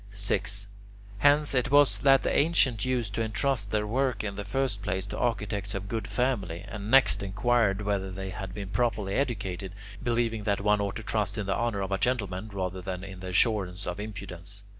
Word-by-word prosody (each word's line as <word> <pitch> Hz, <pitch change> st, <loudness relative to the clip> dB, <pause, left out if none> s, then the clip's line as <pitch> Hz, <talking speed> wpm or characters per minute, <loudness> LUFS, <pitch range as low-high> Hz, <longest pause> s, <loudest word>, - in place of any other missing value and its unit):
6. 100 Hz, 0 st, -1 dB, 0.5 s
Hence 145 Hz, +1 st, +4 dB
it 130 Hz, -1 st, +2 dB
was 145 Hz, 0 st, +5 dB
that 135 Hz, -1 st, +5 dB
the -, -, 0 dB
ancients 140 Hz, -8 st, +3 dB
used 120 Hz, -5 st, -1 dB
to 115 Hz, -, -1 dB
entrust 110 Hz, 0 st, 0 dB
their 105 Hz, 0 st, 0 dB
work 125 Hz, 0 st, 0 dB
in 105 Hz, -2 st, -3 dB
the 100 Hz, +1 st, -5 dB
first 110 Hz, +1 st, -1 dB
place 95 Hz, 0 st, -2 dB
to 100 Hz, -, -6 dB
architects 105 Hz, -4 st, -1 dB
of 100 Hz, 0 st, -4 dB
good 110 Hz, +2 st, -3 dB
family, 100 Hz, -9 st, -1 dB
and 105 Hz, -1 st, -6 dB
next 130 Hz, -4 st, +5 dB
inquired 105 Hz, 0 st, +1 dB
whether 100 Hz, -2 st, -1 dB
they 95 Hz, 0 st, -5 dB
had 95 Hz, 0 st, -6 dB
been 100 Hz, 0 st, -6 dB
properly 105 Hz, -3 st, 0 dB
educated, 100 Hz, -8 st, -2 dB, 0.3 s
believing 115 Hz, -2 st, 0 dB
that 100 Hz, -1 st, +1 dB
one 105 Hz, +1 st, +2 dB
ought 100 Hz, -1 st, -2 dB
to 115 Hz, -, -5 dB
trust 105 Hz, -2 st, -1 dB
in 105 Hz, -, -2 dB
the 95 Hz, -, 0 dB
honour 115 Hz, -4 st, -1 dB
of 95 Hz, 0 st, -3 dB
a 95 Hz, -, 0 dB
gentleman 105 Hz, -5 st, -1 dB
rather 95 Hz, -1 st, -3 dB
than 90 Hz, 0 st, -5 dB
in 95 Hz, -1 st, -8 dB
the 95 Hz, -, -7 dB
assurance 95 Hz, -1 st, +2 dB
of 90 Hz, +2 st, -4 dB
impudence. 100 Hz, -2 st, -6 dB
105 Hz, 200 wpm, -28 LUFS, 95-120 Hz, 0.5 s, was